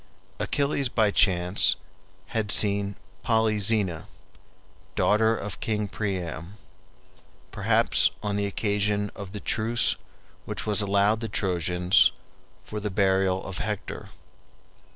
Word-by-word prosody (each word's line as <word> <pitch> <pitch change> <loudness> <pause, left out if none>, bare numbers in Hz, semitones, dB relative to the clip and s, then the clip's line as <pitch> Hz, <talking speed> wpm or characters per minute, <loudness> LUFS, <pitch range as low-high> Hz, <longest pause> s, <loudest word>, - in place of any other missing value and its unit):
Achilles 140 -2 0
by 110 -3 +2
chance 90 -1 +3 0.5
had 110 -2 -1
seen 100 -1 +3 0.3
Polyxena, 105 -6 +1 0.9
daughter 110 +1 +2
of 100 -1 -6
King 105 -2 -2
Priam, 95 -2 -5 0.9
perhaps - - +2
on 105 -1 -2
the 100 0 0
occasion 105 0 -1
of 100 -2 -8
the 105 - -6
truce 115 +3 +1 0.5
which - - -4
was 105 0 +3
allowed 100 +2 +2
the 115 -1 -5
Trojans 90 -2 +2 0.5
for 105 - -6
the 105 0 -3
burial 95 -1 +1
of 95 -1 -6
Hector. 105 -1 -5
100 Hz, 110 wpm, -26 LUFS, 95-110 Hz, 0.9 s, chance